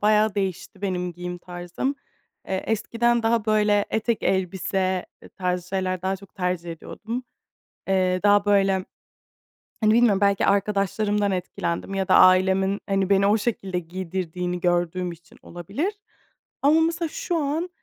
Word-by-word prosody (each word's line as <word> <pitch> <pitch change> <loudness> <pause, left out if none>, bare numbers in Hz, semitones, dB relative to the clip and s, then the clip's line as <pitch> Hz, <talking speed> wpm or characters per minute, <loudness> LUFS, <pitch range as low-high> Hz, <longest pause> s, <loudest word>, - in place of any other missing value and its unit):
bayağı 210 0 +3
değişti 195 0 -4
benim 180 -2 -2
giyim 180 +1 -6
tarzım. 175 +10 -4 0.5
Eee, 190 0 -1
eskiden 235 +2 +1
daha 225 -1 +2
böyle 210 -1 +3
etek, 220 +1 0
elbise 190 0 0 0.3
tarzı 180 -1 -2
şeyler 185 -1 -2
daha 190 +1 0
çok 195 0 -17
tercih 180 -2 -2
ediyordum. 225 +9 -6 0.6
Eee, 185 -1 +2
daha 205 0 +5
böyle, 195 -2 +3 1.0
hani, 215 0 +4
bilmiyorum 225 -4 +4
belki 200 -1 +3
arkadaşlarımdan 200 +1 +1
etkilendim 180 0 -3
ya 190 -1 -1
da 190 - +5
ailemin, 190 +2 +5
hani, 195 -1 +1
beni 200 0 +4
o 210 +2 +4
şekilde 195 -5 -2
giydirdiğini 180 0 -4
gördüğüm 175 0 0
için 170 0 -15
olabilir. 200 - -4 0.7
Ama 305 +3 +5
mesela 330 0 0
şu 475 -2 -3
an, 315 +4 -1
195 Hz, 135 wpm, -24 LUFS, 180-215 Hz, 1.0 s, daha